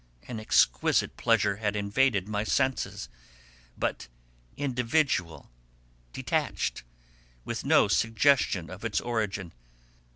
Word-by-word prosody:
An 115 -3 -5
exquisite 65 - +2
pleasure 105 -4 +2
had 105 -1 -2
invaded 100 0 +1
my 105 0 -1
senses, 130 - -1 0.7
but 60 - -2 0.5
individual, 125 - -1 0.6
detached, - - -2 0.6
with - - -4
no - - +4
suggestion 115 - +2
of 95 +3 -10
its 115 -3 0
origin. 105 -6 -3
110 Hz, 95 wpm, -28 LUFS, 100-120 Hz, 0.7 s, no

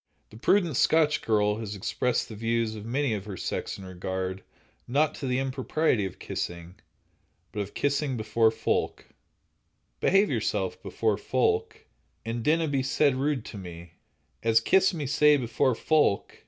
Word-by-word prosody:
The 110 - -12
prudent 170 - +2
Scotch 155 -2 +3
girl 105 -1 +1
has 105 -2 -5
expressed 120 +5 -1
the 110 - -9
views 115 0 -1
of 110 0 -8
many 135 0 0
of 100 -2 -4
her 100 -3 -7
sex - - -4
in 95 - -10
regard, 95 +1 -4 0.5
not 145 +5 +2
to 135 - -5
the 125 0 0
impropriety 130 -3 0
of 95 - -11
kissing, 85 0 -5 0.8
but - - -5
of 100 0 -5
kissing 140 -2 0
"before 110 +1 +2
folk": 110 - -2 0.9
Behave 195 +2 +3
yourself - - -1
before - - -1
folk, 445 0 0 0.4
And 115 0 -3
dinna 160 +3 +2
be 140 -2 0
sae 140 +1 +2
rude 135 -2 -1
to 105 - -8
me, 85 -2 -10 0.5
As 115 0 +4
kiss 190 +11 +3
me 160 -5 -4
sae 150 +2 +4
before 120 0 +1
folk. 150 -7 +1
120 Hz, 155 wpm, -27 LUFS, 105-145 Hz, 0.9 s, As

